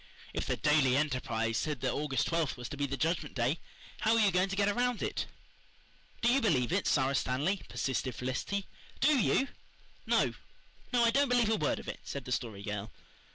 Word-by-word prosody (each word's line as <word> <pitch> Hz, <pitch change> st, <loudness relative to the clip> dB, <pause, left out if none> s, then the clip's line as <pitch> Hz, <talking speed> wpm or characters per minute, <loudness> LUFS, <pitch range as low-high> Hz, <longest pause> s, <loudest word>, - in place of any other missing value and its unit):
If -, -, -2 dB
the -, -, 0 dB
Daily 150 Hz, -4 st, +3 dB
Enterprise 125 Hz, -6 st, 0 dB
said 150 Hz, -5 st, -2 dB
that 130 Hz, -, 0 dB
August 145 Hz, -2 st, 0 dB
twelfth 165 Hz, -6 st, 0 dB
was 125 Hz, -1 st, -6 dB
to -, -, -5 dB
be 145 Hz, 0 st, -1 dB
the 140 Hz, +1 st, -3 dB
Judgment 160 Hz, -1 st, -1 dB
Day 130 Hz, +6 st, +1 dB, 0.4 s
how 220 Hz, +1 st, +3 dB
were -, -, +4 dB
you 205 Hz, -2 st, +4 dB
going 185 Hz, +2 st, +2 dB
to 195 Hz, -, -2 dB
get 200 Hz, 0 st, +2 dB
around 245 Hz, +3 st, +1 dB
it? -, -, -2 dB, 1.0 s
"Do 235 Hz, -, +5 dB
you 275 Hz, -, +3 dB
believe 130 Hz, -, +2 dB
it, 195 Hz, -, +1 dB
Sara 135 Hz, -1 st, +2 dB
Stanley?" 145 Hz, +9 st, 0 dB
persisted 130 Hz, -2 st, -2 dB
Felicity. 130 Hz, +10 st, -2 dB, 0.3 s
"DO 290 Hz, 0 st, +4 dB
you?" 270 Hz, +4 st, +2 dB, 0.6 s
"No -, -, +3 dB, 0.6 s
no, 245 Hz, -2 st, +3 dB
I 230 Hz, -, +5 dB
don't 280 Hz, +2 st, +3 dB
believe 245 Hz, -3 st, +3 dB
a -, -, +4 dB
word 155 Hz, -8 st, 0 dB
of -, -, -9 dB
it," -, -, -5 dB
said 140 Hz, -2 st, -6 dB
the 125 Hz, -, -6 dB
Story 110 Hz, -6 st, -2 dB
Girl. 105 Hz, 0 st, -4 dB
150 Hz, 200 wpm, -32 LUFS, 130-205 Hz, 1.0 s, Do